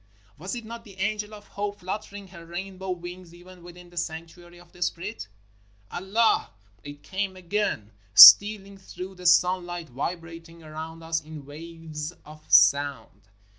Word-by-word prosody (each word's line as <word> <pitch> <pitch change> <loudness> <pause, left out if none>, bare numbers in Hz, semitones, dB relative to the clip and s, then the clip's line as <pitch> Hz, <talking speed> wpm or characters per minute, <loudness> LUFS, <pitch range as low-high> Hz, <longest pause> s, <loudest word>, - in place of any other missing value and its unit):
Was 185 - -6
it 235 -2 -7
not 230 +1 -9
the 200 -4 -15
angel 210 +2 -2
of 210 -1 -12
Hope 205 0 -5
flut 185 +4 -4
tering 200 -1 -12
her 170 -2 -13
rainbow 190 +3 -7
wings, 175 -1 -7
even 180 +1 -16
within 175 0 -14
the 175 - -17
sanctuary 170 +1 -7
of 175 -1 -19
the 175 - -18
Spirit? 180 - -4 0.6
"Allah! 200 +6 +1 0.2
" 100 0 -34
It 145 0 -11
came 190 0 -4
again, 185 - -3 0.2
stealing 200 - +9
through 190 0 -9
the 180 -1 -4
sunlight, 175 -2 +2
vibrating 165 +4 -7
around 160 +1 -9
us 165 0 -2
in 155 -2 -11
waves 160 +1 -8
of 155 +1 -14
sound. 110 0 +3
175 Hz, 155 wpm, -25 LUFS, 160-190 Hz, 0.6 s, stealing